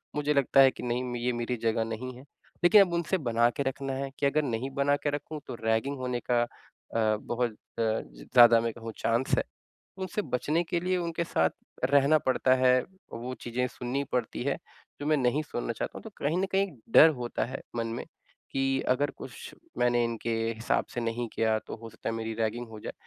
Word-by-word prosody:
मुझे 150 Hz, 0 st, +1 dB
लगता 140 Hz, -1 st, +3 dB
है 135 Hz, -1 st, +7 dB
कि -, -, -10 dB
नहीं 125 Hz, +1 st, -1 dB
म 125 Hz, -1 st, -4 dB
ये 120 Hz, +1 st, 0 dB
मेरी 120 Hz, +1 st, -2 dB
जगह 115 Hz, 0 st, +2 dB
नहीं 115 Hz, +3 st, -5 dB
है। -, -, -11 dB, 0.4 s
लेकिन 205 Hz, +4 st, +8 dB
अब 185 Hz, -3 st, +2 dB
उनसे 170 Hz, +2 st, +1 dB
बना 120 Hz, -6 st, +2 dB
के 140 Hz, -, +1 dB
रखना 135 Hz, 0 st, -3 dB
है 135 Hz, +1 st, -3 dB
कि -, -, +1 dB
अगर 145 Hz, +2 st, +3 dB
नहीं 125 Hz, 0 st, -2 dB
बना 140 Hz, 0 st, +3 dB
के 145 Hz, -, -1 dB
रखूँ 145 Hz, +2 st, -4 dB
तो -, -, -5 dB
रैगिंग 110 Hz, +6 st, +1 dB
होने 125 Hz, -1 st, -2 dB
का 120 Hz, -1 st, +4 dB
अ, -, -, -4 dB, 0.7 s
बहुत 120 Hz, +2 st, -2 dB
अ, -, -, -20 dB, 0.3 s
ज़्यादा 115 Hz, -, +4 dB
मैं 115 Hz, -1 st, -1 dB
कहूँ 115 Hz, -1 st, -7 dB
चांस 115 Hz, +3 st, +1 dB
है। -, -, +2 dB, 0.5 s
उनसे 190 Hz, +2 st, -2 dB
बचने 155 Hz, +1 st, 0 dB
के 170 Hz, 0 st, -1 dB
लिए 185 Hz, +1 st, 0 dB
उनके 170 Hz, -1 st, -1 dB
साथ 80 Hz, -, +2 dB, 0.4 s
रहना 140 Hz, +2 st, +5 dB
पड़ता 130 Hz, -2 st, +2 dB
है, 130 Hz, 0 st, +4 dB, 0.3 s
वो 120 Hz, +2 st, -5 dB
चीज़ें 120 Hz, +1 st, -1 dB
सुननी 125 Hz, +3 st, -3 dB
पड़ती 120 Hz, -1 st, -1 dB
है 140 Hz, +1 st, 0 dB, 0.4 s
जो -, -, -3 dB
मैं 155 Hz, 0 st, +4 dB
नहीं 130 Hz, +3 st, +2 dB
सुनना 120 Hz, -5 st, -3 dB
चाहता 115 Hz, -, -4 dB
हूँ -, -, -10 dB
तो 220 Hz, -, -8 dB
कहीं 150 Hz, +4 st, 0 dB
न 190 Hz, -, +2 dB
कहीं 195 Hz, 0 st, +1 dB, 0.2 s
डर 160 Hz, -, +10 dB
होता 120 Hz, -1 st, -2 dB
है 130 Hz, +2 st, -6 dB
मन 115 Hz, -1 st, -1 dB
में -, -, -5 dB, 0.5 s
कि 135 Hz, 0 st, +1 dB
अगर 140 Hz, +3 st, +2 dB
कुछ -, -, -9 dB, 0.2 s
मैंने 120 Hz, 0 st, +3 dB
इनके 115 Hz, 0 st, -2 dB, 0.2 s
हिसाब 115 Hz, +2 st, 0 dB
से 120 Hz, -, -2 dB
नहीं 115 Hz, +1 st, -2 dB
किया 110 Hz, -1 st, +2 dB
तो -, -, -5 dB
हो 115 Hz, 0 st, -9 dB
सकता 115 Hz, -, -5 dB
है 115 Hz, -, -2 dB
मेरी 115 Hz, 0 st, -3 dB
रैगिंग 115 Hz, +2 st, -1 dB
हो 110 Hz, -1 st, -9 dB
जाए। -, -, -6 dB
125 Hz, 215 wpm, -29 LUFS, 115-145 Hz, 0.7 s, डर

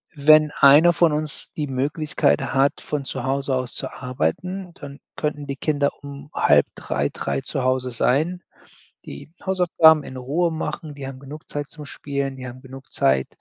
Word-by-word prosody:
Wenn 155 Hz, +1 st, +5 dB
einer 150 Hz, +5 st, +7 dB
von 170 Hz, -1 st, +3 dB
uns 150 Hz, -1 st, -3 dB
die 150 Hz, -, -1 dB
Möglichkeit 145 Hz, +5 st, 0 dB
hat, 135 Hz, +1 st, +1 dB
von 150 Hz, -2 st, -3 dB
zu -, -, -5 dB
Hause 135 Hz, 0 st, -1 dB
aus 130 Hz, -1 st, -3 dB
zu -, -, -4 dB
arbeiten, 180 Hz, +8 st, -3 dB
dann 140 Hz, -1 st, -10 dB, 0.2 s
könnten 150 Hz, -1 st, -3 dB
die 140 Hz, -, -3 dB
Kinder 145 Hz, 0 st, +1 dB
um, 140 Hz, 0 st, -9 dB
14:30 -, -, +1 dB
15:00 70 Hz, 0 st, -3 dB
zu 135 Hz, -, -3 dB
Hause 130 Hz, 0 st, 0 dB
sein, 155 Hz, +10 st, 0 dB, 0.6 s
die 70 Hz, -, -10 dB, 0.2 s
Hausaufgaben 170 Hz, -5 st, +4 dB
in 130 Hz, -, -9 dB
Ruhe 155 Hz, +7 st, 0 dB
machen. 155 Hz, -1 st, -5 dB
Die 140 Hz, -1 st, -7 dB
haben 135 Hz, -1 st, -8 dB
genug 145 Hz, +3 st, -11 dB
Zeit 145 Hz, 0 st, -4 dB
zum 150 Hz, -, -9 dB
Spielen. 140 Hz, -1 st, -4 dB
Die 130 Hz, -1 st, -7 dB
haben 125 Hz, +1 st, -10 dB
genug 135 Hz, 0 st, -12 dB
Zeit, 65 Hz, 0 st, +2 dB
140 Hz, 170 wpm, -22 LUFS, 135-155 Hz, 0.6 s, einer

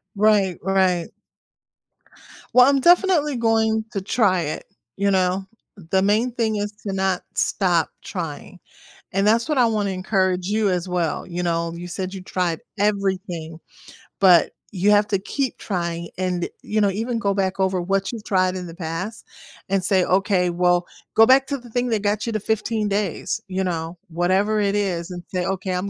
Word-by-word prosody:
Right, 200 Hz, -3 st, +3 dB
right. 185 Hz, -3 st, +1 dB, 1.5 s
Well, 250 Hz, 0 st, +8 dB
I'm 280 Hz, -1 st, +3 dB
definitely 345 Hz, -2 st, +4 dB
going 220 Hz, -1 st, +2 dB
to 195 Hz, -, -2 dB
try 190 Hz, -3 st, +2 dB
it, 155 Hz, -2 st, -4 dB, 0.3 s
you 200 Hz, +1 st, +1 dB
know? 190 Hz, 0 st, +1 dB, 0.5 s
The 190 Hz, 0 st, +3 dB
main 215 Hz, +5 st, +2 dB
thing 225 Hz, -2 st, -1 dB
is 205 Hz, 0 st, -2 dB
to 200 Hz, -, -2 dB
not 190 Hz, -1 st, 0 dB
stop 175 Hz, -5 st, +1 dB
trying, 175 Hz, 0 st, -6 dB, 0.5 s
and 195 Hz, +1 st, +1 dB
that's 230 Hz, +7 st, +3 dB
what 300 Hz, -, +1 dB
I 245 Hz, -, +5 dB
wanna 210 Hz, -3 st, 0 dB
encourage 185 Hz, -1 st, 0 dB
you 210 Hz, 0 st, +1 dB
as 180 Hz, 0 st, -1 dB
well, 175 Hz, -3 st, -1 dB
you 175 Hz, 0 st, -4 dB
know? 170 Hz, -1 st, -1 dB
You 175 Hz, +1 st, -7 dB
said 185 Hz, +1 st, -4 dB
you 190 Hz, -, -7 dB
tried 180 Hz, -3 st, -2 dB, 0.2 s
everything, 190 Hz, -5 st, -1 dB, 0.6 s
but 180 Hz, -4 st, +6 dB, 0.2 s
you 195 Hz, +2 st, +2 dB
have 205 Hz, 0 st, +4 dB
to 195 Hz, -, +1 dB
keep 260 Hz, +6 st, -3 dB
trying 170 Hz, -3 st, -3 dB
and, 180 Hz, -2 st, -1 dB
you 215 Hz, 0 st, -1 dB
know, 200 Hz, -, +4 dB
even 225 Hz, +4 st, -2 dB
go 200 Hz, -3 st, +1 dB
back 195 Hz, -1 st, -1 dB
over 190 Hz, -1 st, +1 dB
what 195 Hz, +2 st, -1 dB
you've 230 Hz, -3 st, -7 dB
tried 185 Hz, -1 st, +1 dB
in 180 Hz, -, -5 dB
the 165 Hz, -, -9 dB
past 175 Hz, +5 st, -5 dB, 0.5 s
and 195 Hz, -1 st, +1 dB
say, 190 Hz, -1 st, +3 dB
"Okay, 185 Hz, -1 st, +2 dB
well" 175 Hz, 0 st, +2 dB, 0.3 s
Go 225 Hz, -, +8 dB
back 265 Hz, +1 st, +6 dB
to 280 Hz, -, -2 dB
the 240 Hz, 0 st, -14 dB
thing 245 Hz, +2 st, -1 dB
that 220 Hz, -3 st, 0 dB
got 205 Hz, +1 st, 0 dB
you 230 Hz, -, -2 dB
the 215 Hz, -, 0 dB
15 220 Hz, 0 st, -1 dB
days, 200 Hz, -3 st, -1 dB
you 190 Hz, 0 st, -2 dB
know? 170 Hz, -1 st, -3 dB
Whatever 190 Hz, +5 st, +1 dB
it 200 Hz, -1 st, +1 dB
is 180 Hz, -4 st, -1 dB
and 175 Hz, -1 st, -7 dB
say, 180 Hz, -1 st, 0 dB
"Okay, 190 Hz, 0 st, -2 dB
I'm 180 Hz, +2 st, -2 dB
195 Hz, 180 wpm, -22 LUFS, 180-215 Hz, 1.5 s, Well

